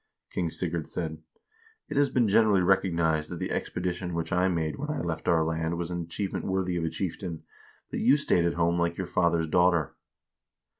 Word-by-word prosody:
King 85 -2 -1
Sigurd 85 -1 -3
said: 80 -2 -4 0.3
' 445 0 -32
It - - -3
has 140 0 +3
been 120 -3 +2
generally 100 -2 +4
recognized 85 -5 +2
that 90 - -5
the - - -3
expedition 90 0 -3
which 85 +2 -2
I 90 +1 +3
made 80 -4 -1
when 150 +2 -4
I 150 - -2
left 80 -2 -3
our 80 -2 +4
land 80 +1 -1
was 85 0 -3
an 85 -1 -2
achievement 95 +4 -3
worthy 95 -2 0
of 85 - -1
a 80 - 0
chieftain, 85 -2 -4 0.5
but - - -2
you 130 +5 +5
stayed 90 - +2
at 85 - 0
home 85 0 +2
like 85 0 0
your 95 - -2
father's 85 -2 +1
daughter.' 85 -2 +2
85 Hz, 200 wpm, -28 LUFS, 85-95 Hz, 0.5 s, you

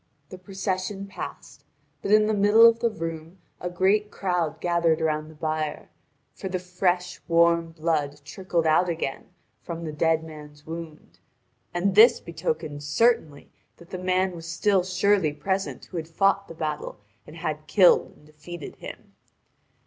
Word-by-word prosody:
The 185 - -10
procession 195 +1 -3
passed, 195 - -9 0.4
but - - -4
in 215 +1 +6
the 215 - +1
middle 210 +3 +6
of 230 0 +6
the 235 - +2
room 165 -3 -6 0.2
a 180 - -3
great 195 +4 +2
crowd 180 -6 -2
gathered 170 -2 +2
about 155 -1 -1
the 160 - -14
bier, 155 -1 -3 0.4
for 190 - -6
the 185 - -1
fresh 180 0 -1
warm 170 -1 +3
blood 155 -3 -1
trickled 175 +1 -2
out 160 +3 +3
again 160 -5 -3 0.3
from 170 -1 -6
the 155 - -4
dead 160 +1 +1
man's 150 -2 -12
wound, 165 -1 -9 0.5
and 180 +3 0
this 230 +4 +7
betokened 155 -3 -4
certainly 150 -2 +1 0.3
that 170 +1 -17
the 185 - -5
man 185 0 0
was 165 -1 -9
still 185 +3 +2
surely 185 -3 +2
present 190 +6 -3
who 180 - -8
had 160 -1 -4
fought 195 +4 +1
the 165 - -10
battle 155 -2 -4 0.3
and 155 - -11
had 155 -2 -4
killed 185 -1 +5
and 150 - -21
defeated 155 +2 -10
him. - - -10
170 Hz, 155 wpm, -25 LUFS, 155-190 Hz, 0.5 s, this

